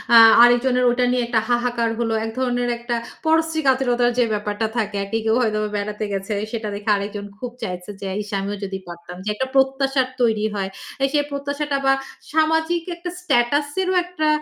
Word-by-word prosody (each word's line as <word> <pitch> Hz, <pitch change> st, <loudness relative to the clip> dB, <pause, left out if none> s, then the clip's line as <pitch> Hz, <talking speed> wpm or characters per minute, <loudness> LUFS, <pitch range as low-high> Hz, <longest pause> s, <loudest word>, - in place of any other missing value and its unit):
আ -, -, +11 dB, 0.3 s
আরেকজনের 250 Hz, +1 st, +4 dB
ওইটা 245 Hz, +1 st, +2 dB
নিয়ে 250 Hz, -1 st, +1 dB
একটা 230 Hz, -2 st, +2 dB
হাহাকার 240 Hz, -1 st, +1 dB
হল। 230 Hz, -1 st, 0 dB
এক 225 Hz, -, -4 dB
ধরনের 245 Hz, -1 st, 0 dB
একটা 240 Hz, 0 st, -3 dB, 0.3 s
পরশ্রী 320 Hz, 0 st, +2 dB
কাতরতার 245 Hz, -2 st, +3 dB
যে -, -, +6 dB
ব্যাপারটা 210 Hz, +1 st, -1 dB
থাকে 210 Hz, -2 st, -1 dB
আরকি। 200 Hz, +3 st, -2 dB
কেউ 220 Hz, +1 st, +3 dB
হয়তো 215 Hz, -3 st, +1 dB, 0.2 s
বেড়াতে 210 Hz, +1 st, -3 dB
গেছে, 195 Hz, +2 st, -3 dB, 0.2 s
সেটা 220 Hz, -2 st, -3 dB
দেখে 205 Hz, +2 st, -4 dB
আরেকজন 200 Hz, 0 st, -4 dB
খুব 250 Hz, 0 st, -5 dB
চাইছে 180 Hz, -1 st, -5 dB
যে, 195 Hz, -, -4 dB
ইশ! 210 Hz, -, -8 dB
আমিও 200 Hz, +1 st, -3 dB
যদি 190 Hz, -1 st, -3 dB
পারতাম 175 Hz, 0 st, -9 dB
যে 210 Hz, -, -3 dB
একটা 260 Hz, -, -2 dB
প্রত্যাশার 270 Hz, 0 st, +2 dB
তৈরি 220 Hz, -3 st, +2 dB
হয়। 195 Hz, -1 st, -2 dB, 0.3 s
আ -, -, +2 dB
সেই 290 Hz, -, +3 dB
প্রত্যাশাটা 280 Hz, 0 st, -2 dB
বা 270 Hz, -, +5 dB, 0.4 s
সামাজিক 320 Hz, +2 st, +2 dB
একটা 350 Hz, +1 st, -6 dB
স্ট্যাটাস 285 Hz, -3 st, +2 dB
এরও 375 Hz, 0 st, 0 dB
আ -, -, +2 dB
একটা 355 Hz, -4 st, -2 dB
240 Hz, 185 wpm, -21 LUFS, 210-275 Hz, 0.4 s, আ